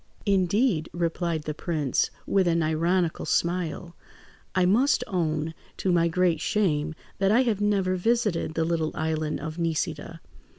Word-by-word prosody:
"Indeed!" 195 -2 +2
replied 170 -1 -1
the 150 - -3
prince, 150 -4 0 0.2
with 190 -2 +2
an 170 -1 +2
ironical 165 +2 0
smile. 170 0 -1 0.6
"I 185 -1 +3
must 240 +10 +3
own, 160 -3 -1 0.2
to 190 - 0
my 170 -1 +3
great 170 -2 +1
shame, 160 -8 0 0.2
that 195 0 +3
I 240 +4 +5
have 220 -5 0
never 195 -3 +1
visited 210 -6 0
the 160 - +1
little 160 -2 -1
island 155 -1 -1
of 160 +2 -6
Nisida. 165 -1 -2
170 Hz, 140 wpm, -26 LUFS, 160-190 Hz, 0.6 s, I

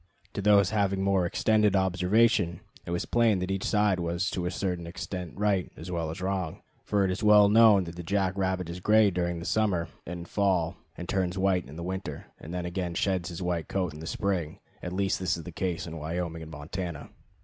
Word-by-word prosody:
To - - -3
those 100 -1 +5
having 100 -2 +1
more 95 -2 +2
extended 105 +2 +2
observation 95 0 +2 0.3
it - - -5
was 85 0 -1
plain 115 -4 +3
that 90 +1 -2
each 95 0 -2
side 105 -3 +2
was 85 +2 -1
to 90 -1 -2
a - - 0
certain 90 -2 -3
extent 90 0 -6
right 100 -3 +1
as 85 +3 -7
well 85 -2 -2
as 80 +3 -6
wrong, 95 -4 -2 0.2
for 100 -2 +1
it 95 - +1
is 90 - -3
well 105 -1 +7
known 110 -2 +6
that 85 -1 -8
the 90 - -6
jack 95 +1 0
rabbit 95 -2 -1
is 85 +1 -6
gray 105 +2 +4
during 85 -1 -2
summer 95 -5 0 0.2
and 85 0 -6
fall 95 -4 +1 0.2
and 90 - -6
turns 95 -1 -1
white 95 -5 +1
in 75 - -10
the 85 - -6
winter, 95 +2 -5
and 80 - -9
then 90 0 -3
again 90 -1 -3
sheds 95 -2 0
his 85 +1 -6
white 85 -3 -1
coat 90 -5 -1
in 75 +1 -9
spring: 90 -7 -2 0.2
at 90 - -5
least 95 +1 0
this 90 -2 0
is 85 - -7
the 90 - -8
case 90 0 -2
in 80 -1 -7
Wyoming 80 +1 -3
and 80 0 -9
Montana. 80 +1 -6
90 Hz, 215 wpm, -28 LUFS, 85-100 Hz, 0.3 s, well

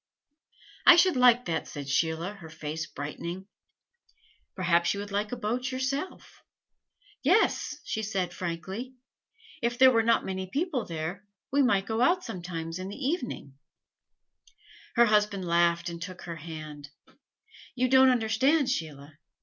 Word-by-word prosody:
"I 350 - +11
should 345 -1 +4
like 250 -1 +5
that," 165 -1 -2
said 145 -2 -7
Sheila, 160 +6 0
her 180 -6 -12
face 155 0 -5
brightening. 170 +6 -6 1.1
"Perhaps 175 -1 +2
you - - -5
would 205 0 -6
like 205 +2 -1
a - - -2
boat 245 +4 -2
yourself?" 275 +6 -4 0.8
"Yes," 360 +10 +2
she 220 - -3
said, 190 -4 -2
frankly. 190 +10 -5 0.7
"If 240 +1 -1
there 260 0 +7
were 230 -2 +3
not 230 +1 +2
many 190 0 -4
people 280 - -2
there, 170 +5 -5 0.2
we 285 +2 +3
might 200 -7 +2
go 225 +2 -2
out 355 +8 +3
sometimes 170 -2 -5
in 185 +1 -5
the 200 - -7
evening 255 - -4 0.6
" 440 -2 -26
Her 235 0 +6
husband 210 -3 +1
laughed 170 0 +2
and 170 -1 -6
took 185 -1 -7
her 170 -1 -6
hand: 155 -2 -9 0.9
"You 255 0 +1
don't 260 +1 +6
understand, 255 +4 +2
Sheila. 150 - -5
200 Hz, 145 wpm, -28 LUFS, 170-255 Hz, 1.1 s, I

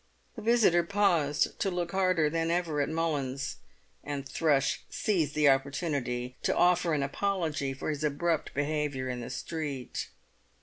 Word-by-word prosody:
The 225 - -7
visitor 220 -6 +4
paused 170 -6 +1
to 195 - +1
look 175 -2 -2
harder 185 -5 +2
than 165 +2 0
ever 170 -4 0
at 145 - 0
Mullins, 145 -5 -2 0.5
and 140 -2 -4
Thrush 140 -1 +1
seized 165 -9 0
the 150 -1 +4
opportunity 135 -3 0
to - - +1
offer 175 -2 +3
an 140 - 0
apology 155 -3 -1
for 135 - -6
his 150 0 -4
abrupt 155 +2 0
behaviour 145 -3 -1
in 125 -1 -3
the 120 - -6
street. 145 -2 -4
150 Hz, 145 wpm, -29 LUFS, 140-170 Hz, 0.5 s, visitor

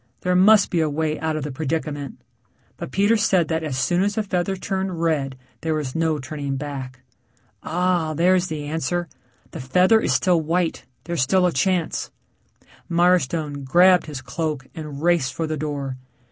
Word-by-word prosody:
There 180 0 +1
must 200 +3 +5
be 175 - +1
a 155 - +1
way 155 +1 -1
out 160 -1 -1
of 155 - -3
the 150 - -4
predicament. 145 -1 -4 0.6
But - - -7
Peter 200 - +3
said 190 -6 +2
that 160 -1 0
as 150 -5 -3
soon 175 +6 +1
as 200 +1 0
the 220 - 0
feather 190 -1 -1
turned 190 -2 -3
red 145 -5 0 0.2
there 160 -1 -1
was 145 -4 -3
no 160 -1 0
turning 140 0 -4
back. 135 -2 -6 0.6
Ah 175 -2 0
there's 180 +3 +3
the 155 -3 -4
answer. 165 +3 -2 0.4
The - - -7
feather 180 - +4
is - - 0
still 180 -3 +3
white... 165 +2 -1 0.2
there's 170 -3 -2
still 180 +8 +3
a 180 - +2
chance. 180 +2 0 0.8
Mirestone 170 -4 +1
grabbed 180 +6 +5
his 145 -4 -7
cloak 155 -5 -3
and 150 -2 -7
raced 170 -7 +2
for 165 - -1
the 155 0 -2
door. 140 -3 -4
160 Hz, 175 wpm, -22 LUFS, 145-180 Hz, 0.8 s, must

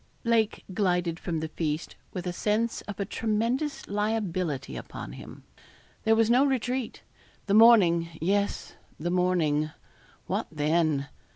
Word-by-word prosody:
Lake 230 -3 +1
glided 180 -4 0
from 165 -3 -3
the 160 - -2
feast 155 0 -3 0.2
with 180 -2 -5
a 180 - -2
sense 220 +5 0
of 205 -1 -7
a 200 - 0
tremendous 230 +9 -1
liability 190 -9 -2
upon - - -7
him. - - -11 0.6
There 220 0 +5
was 225 0 +3
no 245 +4 +5
retreat. 255 -2 -1 0.4
The 200 - 0
morning 200 -7 +6
yes, 200 +5 0 0.3
the 175 +3 -2
morning 170 -5 +1 0.6
what - - -2
then? 155 -2 +1
190 Hz, 130 wpm, -27 LUFS, 165-225 Hz, 0.6 s, morning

